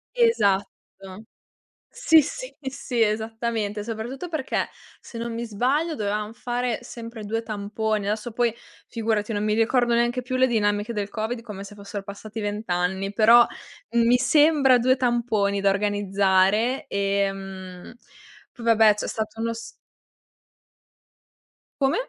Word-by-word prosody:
Esatto. 200 - 0 0.7
Sì, 320 - +5
sì, - - -6
sì, 265 -3 -3
esattamente, 220 -1 -2
soprattutto 235 +8 -5
perché, 315 -6 -2 0.3
se 230 - -10
non 235 0 -4
mi 235 +1 -3
sbaglio, 270 +10 0
dovevam 210 -1 -2
fare 245 0 -2
sempre 230 -2 -9
2 225 +2 -2
tamponi, 215 -1 -2
adesso 215 +3 -2
poi 235 0 +1 0.4
figurati 220 -1 -1
non 205 0 -1
mi 210 0 +1
ricordo 240 +2 +2
neanche 240 +1 +1
più 255 0 -3
le 260 0 +4
dinamiche 205 -2 0
del 205 -3 -3
covid 225 +2 -3
come 205 -4 -8
se 200 +1 -11
fossero 200 0 -7
passati 200 +2 -8
20 205 +1 -4
anni, 190 +3 -1
però 230 +3 +7 0.5
mi 235 +1 +4
sembra 290 -2 +4
2 255 +2 +3
tamponi 230 -6 0
da 200 - +4
organizzare, 200 +3 +2
ehm, 195 -1 -3 0.6
p 245 - -14
va 230 0 +4
beh 215 -1 +6
c'è - - -4
stato 220 0 -4
uno 230 0 -1
s 230 0 -8 2.2
Come? 270 0 +3
220 Hz, 135 wpm, -24 LUFS, 205-240 Hz, 2.2 s, però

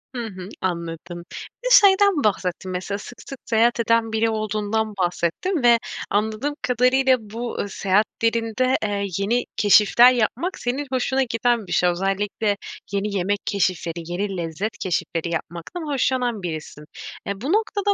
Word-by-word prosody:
Hı 240 -1 -3
hı, 185 -2 -9
anladım. 170 -1 -4 0.4
Bir - - 0
de - - -3
şeyden 400 - +6
bahsettin 185 -2 -1
mesela 185 +2 -3
sık 245 +4 -11
sık 275 - -7
seyahat 235 +1 +2
eden 230 -1 +2
biri 225 +1 +1
olduğundan 215 0 -1
bahsettin. 180 - -1
Ve 235 -1 +6 0.3
anladığım 220 +8 -1
kadarıyla 255 +1 +3
bu, 225 +3 -6
ııı, 205 - -2
seyahatlerinde, 230 +6 +1
eee, 200 -1 -1
yeni 235 +5 +1
keşifler 215 +4 +6
yapmak 255 - -1
senin 265 +4 -2
hoşuna 260 +1 +1
giden 235 -3 0
bir - - -9
şey. 180 - +3
Özellikle 200 +3 -1 0.3
yeni 200 +1 -2
yemek 200 +3 0
keşifleri, 180 -4 -1 0.2
yeni 195 +1 -2
lezzet 170 +6 -4
keşifleri 170 -2 -2
yapmaktan 170 - -5
hoşlanan 250 -5 0
birisin. 155 -2 -6 0.4
E, 200 +1 -4
bu 295 +8 -1
noktada 410 -2 +1
215 Hz, 145 wpm, -22 LUFS, 190-245 Hz, 0.4 s, şeyden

